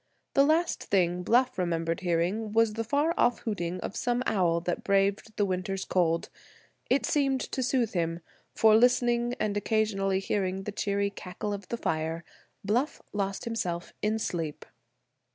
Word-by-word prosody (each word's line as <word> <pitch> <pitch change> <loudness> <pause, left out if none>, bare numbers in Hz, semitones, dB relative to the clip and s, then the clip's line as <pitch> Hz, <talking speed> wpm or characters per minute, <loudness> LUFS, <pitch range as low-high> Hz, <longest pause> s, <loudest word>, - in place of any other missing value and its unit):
The 275 - +5
last 320 +4 +1
thing 180 -2 +1
Bluff 245 +4 +2
remembered 165 -2 -1
hearing 185 +5 0
was 225 -1 +3
the 225 +1 -2
far 290 +8 +1
off 240 0 +3
hooting 185 -5 -3
of - - -5
some 245 0 0
owl 175 -5 +2
that 175 +1 -2
braved 200 +2 +1
the 205 - +3
winter's 190 0 -2
cold. 170 -2 +1 0.6
It 270 - +2
seemed 275 -3 +1
to 260 - -3
soothe 250 -3 +1
him, 165 -1 -1 0.3
for, 220 -1 +6
listening, 240 0 +3
and 205 -1 0
occasionally 205 -2 +1
hearing 190 -1 -1
the 210 - -4
cheery 200 0 -1
cackle 200 +2 -5
of 200 -2 -6
the 235 - -3
fire, 165 -3 -2 0.4
Bluff 245 +9 0
lost 195 -1 -2
himself 180 -7 -3
in 215 +1 +1
sleep. 165 -8 -3
200 Hz, 155 wpm, -28 LUFS, 180-230 Hz, 0.6 s, for